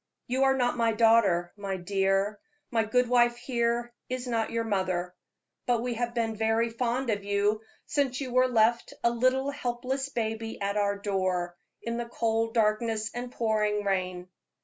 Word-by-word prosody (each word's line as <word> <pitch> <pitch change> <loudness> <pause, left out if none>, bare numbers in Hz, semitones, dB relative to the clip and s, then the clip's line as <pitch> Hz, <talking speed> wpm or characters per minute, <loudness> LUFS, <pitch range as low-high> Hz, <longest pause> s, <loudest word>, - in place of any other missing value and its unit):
You 260 +2 +1
are 270 0 +4
not 245 -1 +1
my 230 -1 +2
daughter, 215 -6 +4
my 200 -2 -4
dear; 195 +2 0 0.3
my 225 -2 +2
good 250 +3 +2
wife 240 0 +3
here 240 -1 -1 0.2
is 255 0 -3
not 230 -3 -1
your 230 0 -1
mother; 185 -4 -1 0.5
but 240 -2 +2
we 245 -1 -1
have 240 +1 -3
been 225 -2 0
very 225 +1 +1
fond 240 +1 -1
of 205 -1 -2
you 205 +1 +1 0.2
since 270 -3 0
you 260 -3 -4
were 255 0 +5
left 235 -1 +2
a 235 - +4
little 255 +3 +1
helpless 265 0 -3
baby 225 -2 -3
at 200 0 -1
our 200 -1 +1
door, 185 -3 -1 0.3
in 230 0 -2
the 240 0 -4
cold 225 0 0
darkness 220 0 +1
and 245 0 -5
pouring 210 -3 0
rain." 185 -2 -1
225 Hz, 170 wpm, -28 LUFS, 205-240 Hz, 0.5 s, were